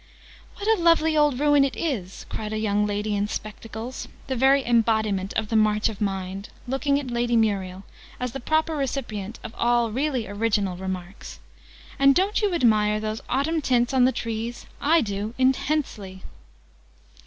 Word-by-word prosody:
"What 405 - -6
a 440 -5 +3
lovely 330 -2 +4
old 295 -4 +3
ruin 290 -1 +4
it 275 - -1
is!" 215 - -3
cried 215 0 -5
a - - -1
young 210 -1 +1
lady 205 0 -1
in 205 0 0
spectacles, 220 +3 -6 0.2
the 265 - -2
very 270 +2 +4
embodiment 220 -5 +1
of 220 -1 -2
the 225 - -1
March 215 0 +3
of 215 -2 -8
Mind, 195 0 -3 0.2
looking 280 +2 +1
at 265 -4 -6
Lady 240 0 0
Muriel, 195 -4 0 0.4
as 250 -1 -2
the 270 - -5
proper 315 +4 0
recipient 235 -7 -3
of 225 - -7
all 235 -1 +2
really 260 -1 -1
original 205 -2 0
remarks. 185 0 -7 0.6
"And 275 0 +6
don't 395 +4 +2
you 415 -2 +1
admire 215 -6 +3
those 215 +1 -4
autumn 310 +5 0
tints 245 -2 +1
on 255 -2 +5
the 260 - +4
trees? 230 0 -4 0.2
I 325 +3 +4
do, 205 0 -4
intensely!" 260 -7 -1
230 Hz, 165 wpm, -24 LUFS, 210-275 Hz, 0.6 s, And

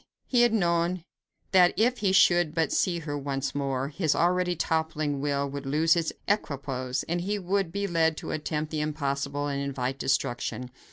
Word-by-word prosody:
He 245 -2 +2
had 240 -1 +5
known 175 -3 +1 0.5
that 180 -2 +5
if 245 +4 +2
he 195 -3 +2
should 175 -4 +4
but 160 -3 +1
see 175 -2 +1
her 145 -2 -4
once 140 -1 -3
more, 135 -1 -2
his 155 0 0
already 180 +1 +2
toppling 155 -3 -1
will 140 -1 0
would 140 0 -6
lose 160 +4 +3
its 165 -2 0 0.2
equipoise, 135 -9 -1
and 175 +1 -2
he 205 +3 -1
would 195 -2 -1
be 200 +3 -2
led 165 -4 +1
to - - -5
attempt 155 0 -3
the 155 -1 -1
impossible 145 -1 -2
and 140 -1 -2
invite 135 -1 -3
destruction. 125 -2 -1
155 Hz, 175 wpm, -27 LUFS, 140-175 Hz, 0.5 s, had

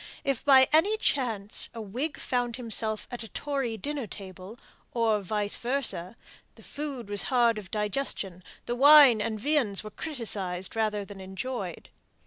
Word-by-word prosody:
If 275 -3 -1
by 265 -2 +7
any 395 +8 +4
chance 225 - -1
a - - -6
Whig 245 +9 -4
found 245 -2 -1
himself 220 -3 -2
at 245 - -5
a 225 - -5
Tory 270 -4 -3
dinner 280 +1 -3
table 190 +2 -9 0.4
or 225 -3 +2
vice 205 +1 0
versë 235 -7 -1 0.4
the - - -17
food 280 -6 -6
was 205 -1 -3
hard 235 -4 +3
of 190 -4 -11
digestion, 210 -4 -2 0.3
and 240 0 -3
wine 285 -5 +8
and 215 0 -2
viands 245 -7 +1
were 215 - -8
criticized 200 - -2
rather 210 -2 0
than 195 -1 -10
enjoyed. 190 0 -5
230 Hz, 150 wpm, -28 LUFS, 205-265 Hz, 0.4 s, wine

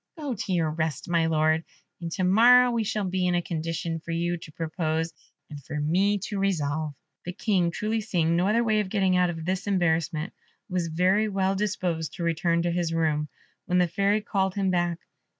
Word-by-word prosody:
Go 290 -5 -3
to 205 -2 -4
your 165 -4 +1
rest, 160 -3 -3
my 170 -2 +2
Lord, 155 0 +2 0.4
and 170 -1 -4
to 185 - -1
morrow 245 +6 +6
we 230 -2 0
shall 210 0 -2
be 185 0 0
in 180 - +1
a 175 - +2
condition 165 0 -3
for 165 - -15
you 170 +1 0
to 165 -2 -10
propose, 160 0 -2 0.3
and 145 -2 -10
for 150 +3 -5
me 185 +7 +2
to 205 - -4
resolve." 155 -6 -1 0.3
The 180 - -5
King, 185 -3 +1
truly 215 +6 -2
seeing 170 -6 +1
no 180 +2 +2
other 230 +3 +3
way 215 -2 +2
of 205 -3 -1
getting 190 -2 +2
out 180 -1 +3
of 165 -2 -5
this 185 +2 -2
embarrassment, 165 -3 0 0.3
was 180 -2 -1
very 185 +6 +2
well 195 -1 +1
disposed 185 -5 -2
to 175 - -5
return 170 0 +1
to 175 - 0
his 170 -1 -1
room, 155 -2 0 0.4
when 180 -1 +2
the 180 -1 +4
Fairy 200 +5 +1
called 190 -2 -1
him 195 -2 +1
back. 175 -1 0
175 Hz, 205 wpm, -26 LUFS, 165-195 Hz, 0.4 s, morrow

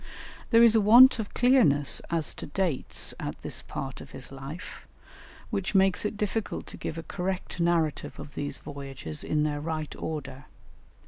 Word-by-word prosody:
There 230 -1 +6
is 230 -1 +7
a 220 - +5
want 240 +5 +8
of 215 - -4
clearness 235 - +4
as 165 -3 0
to - - -8
dates 165 -2 -1
at - - -5
this - - -3
part 135 -1 -6
of - - -11
his 130 0 -9
life, 135 +6 -9 0.6
which 200 -2 -2
makes 190 +1 +3
it 210 0 -2
difficult 210 +1 -2
to - - -6
give 160 - -5
a 165 - -5
correct 180 +1 -4
narrative 170 -3 0
of 145 - -9
these 145 -1 -4
voyages 135 - -5
in 150 -1 0
their 145 -1 -1
right 155 -1 -4
order. 140 -4 -6
160 Hz, 170 wpm, -28 LUFS, 145-200 Hz, 0.6 s, want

